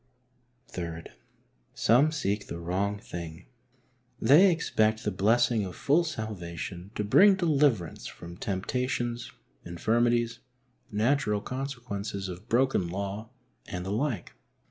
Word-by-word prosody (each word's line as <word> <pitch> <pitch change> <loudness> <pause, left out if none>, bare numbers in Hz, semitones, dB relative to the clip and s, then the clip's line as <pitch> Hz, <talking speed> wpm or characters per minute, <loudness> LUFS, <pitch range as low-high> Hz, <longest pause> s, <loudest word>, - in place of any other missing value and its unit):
III. 85 -2 -4 0.7
Some 130 +8 +4
seek 105 -9 -2
the - - -5
wrong 95 +4 -1
thing. 85 -4 -8 0.7
They 150 - +7
expect 110 -10 +1
the 105 - 0
blessing 110 +3 +3
of 90 -2 -6
full 155 +5 +3
salvation 95 - -5
to 105 - -1
bring 190 - +6
deliverance 145 - +1
from 85 0 -10
temptations, 120 +5 -2 0.3
infirmities, 115 +6 +1 0.5
natural 105 0 +1
consequences 115 -6 -4
of 90 +6 -9
broken 125 -6 +2
law 100 +4 -4 0.4
and 90 0 -5
the 95 - -3
like. 115 -3 -2
110 Hz, 110 wpm, -28 LUFS, 95-125 Hz, 0.7 s, They